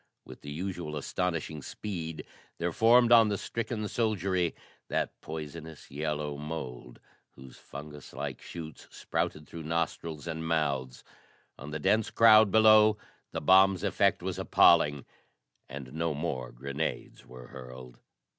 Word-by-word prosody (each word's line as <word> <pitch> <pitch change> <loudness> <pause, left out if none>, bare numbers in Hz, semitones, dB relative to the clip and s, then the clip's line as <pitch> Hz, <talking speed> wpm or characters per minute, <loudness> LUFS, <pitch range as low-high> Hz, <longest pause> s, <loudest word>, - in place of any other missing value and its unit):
With - - -12
the 75 - -9
usual 85 -1 -4
astonishing 80 0 -3
speed 80 -3 -6 0.3
there 85 +1 -1
formed 120 +5 +5
on 115 -2 +7
the 100 - -1
stricken 115 +1 -4
soldiery 95 -6 0 0.3
that - - -2
poisonous 80 0 -8
yellow 75 0 -3
mould, 65 -5 -7 0.4
whose 65 -1 -13
fungus 75 0 -10
like - - -5
shoots 80 -2 -9
sprouted 75 0 -3
through 85 - -8
nostrils 80 -1 -3
and 80 -1 -4
mouths. 70 -6 -1 0.6
On 70 - -8
the 75 - -3
dense 100 +8 +2
crowd 110 -2 +7
below 110 0 +6 0.3
the - - -4
bomb's 95 +2 +5
effect 100 -2 +2
was 95 0 -3
appalling, 75 -6 +4 0.6
and 70 -1 -8
no 80 -1 -1
more 70 -6 -3
grenades 70 +5 -5
were 60 0 -12
hurled.... 65 -1 -11
80 Hz, 130 wpm, -29 LUFS, 75-95 Hz, 0.6 s, on